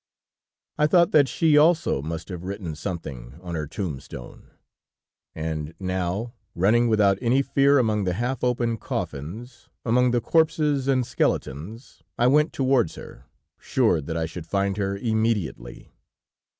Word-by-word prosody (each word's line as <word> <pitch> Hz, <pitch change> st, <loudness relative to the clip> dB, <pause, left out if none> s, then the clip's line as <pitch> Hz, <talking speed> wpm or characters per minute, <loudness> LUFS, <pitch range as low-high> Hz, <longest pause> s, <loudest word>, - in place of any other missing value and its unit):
"I 150 Hz, -, +4 dB
thought 170 Hz, +1 st, +4 dB
that 145 Hz, -3 st, +5 dB
she 150 Hz, +3 st, +4 dB
also 160 Hz, -, +3 dB
must 80 Hz, +4 st, -6 dB
have 90 Hz, -2 st, -6 dB
written 95 Hz, -3 st, -5 dB
something 75 Hz, -7 st, -6 dB
on 90 Hz, -1 st, -7 dB
her 75 Hz, -3 st, -3 dB
tombstone, 70 Hz, -8 st, -7 dB, 0.9 s
and 80 Hz, 0 st, -4 dB
now, 95 Hz, +5 st, -2 dB, 0.2 s
running 110 Hz, +7 st, +3 dB
without 100 Hz, -3 st, +3 dB
any 130 Hz, +3 st, +2 dB
fear 140 Hz, +1 st, +3 dB
among 110 Hz, -5 st, +1 dB
the 90 Hz, -1 st, 0 dB
half 120 Hz, +4 st, -2 dB
open 120 Hz, -2 st, 0 dB
coffins, 110 Hz, -, -6 dB, 0.2 s
among 125 Hz, +2 st, +3 dB
the 120 Hz, 0 st, +2 dB
corpses 150 Hz, -1 st, +1 dB
and 130 Hz, -2 st, +2 dB
skeletons, 100 Hz, -, -3 dB, 0.2 s
I 120 Hz, -, +2 dB
went 150 Hz, +5 st, +4 dB
towards 130 Hz, -, +1 dB
her, -, -, -12 dB, 0.3 s
sure -, -, +1 dB
that 80 Hz, +3 st, -4 dB
I 80 Hz, -, 0 dB
should 85 Hz, 0 st, -8 dB
find 100 Hz, 0 st, 0 dB
her 100 Hz, -1 st, -1 dB
immediately. 110 Hz, -, -2 dB
105 Hz, 140 wpm, -24 LUFS, 85-125 Hz, 0.9 s, that